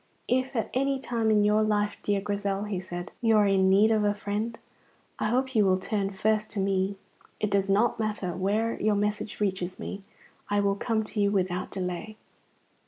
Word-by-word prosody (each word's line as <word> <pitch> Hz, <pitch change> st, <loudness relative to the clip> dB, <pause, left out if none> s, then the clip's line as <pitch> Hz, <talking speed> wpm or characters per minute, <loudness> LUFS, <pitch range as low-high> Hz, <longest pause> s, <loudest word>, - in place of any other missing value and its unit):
"If 260 Hz, +2 st, 0 dB
at 225 Hz, -, -1 dB
any 275 Hz, +1 st, +1 dB
time 235 Hz, -4 st, -1 dB
in 210 Hz, -1 st, +4 dB
your 210 Hz, +1 st, +3 dB
life, 210 Hz, -1 st, +1 dB
dear 200 Hz, -1 st, 0 dB
Grizel," 200 Hz, -1 st, -2 dB
he 210 Hz, -3 st, -3 dB
said, 175 Hz, 0 st, -6 dB
"you 225 Hz, -2 st, +4 dB
are 210 Hz, -, +5 dB
in 190 Hz, -1 st, +3 dB
need 205 Hz, +3 st, +5 dB
of 215 Hz, -1 st, +2 dB
a 205 Hz, 0 st, +2 dB
friend, 210 Hz, +3 st, -3 dB, 0.6 s
I -, -, 0 dB
hope 260 Hz, +3 st, 0 dB
you 215 Hz, -3 st, +4 dB
will 185 Hz, -1 st, +3 dB
turn 195 Hz, +1 st, -1 dB
first 215 Hz, +2 st, 0 dB
to 210 Hz, -, -3 dB
me. 195 Hz, 0 st, 0 dB, 0.4 s
It 210 Hz, -, -1 dB
does 195 Hz, 0 st, +1 dB
not 210 Hz, +3 st, +2 dB
matter 210 Hz, -5 st, -2 dB
where 210 Hz, +5 st, 0 dB
your 215 Hz, 0 st, +2 dB
message 210 Hz, +1 st, -2 dB
reaches 185 Hz, -3 st, -1 dB
me, 200 Hz, -, -6 dB, 0.5 s
I 205 Hz, 0 st, +2 dB
will 200 Hz, 0 st, +2 dB
come 220 Hz, +2 st, 0 dB
to 215 Hz, 0 st, -3 dB
you 200 Hz, -, +3 dB
without 185 Hz, -2 st, -1 dB
delay." 190 Hz, +3 st, -4 dB
205 Hz, 195 wpm, -27 LUFS, 195-220 Hz, 0.6 s, are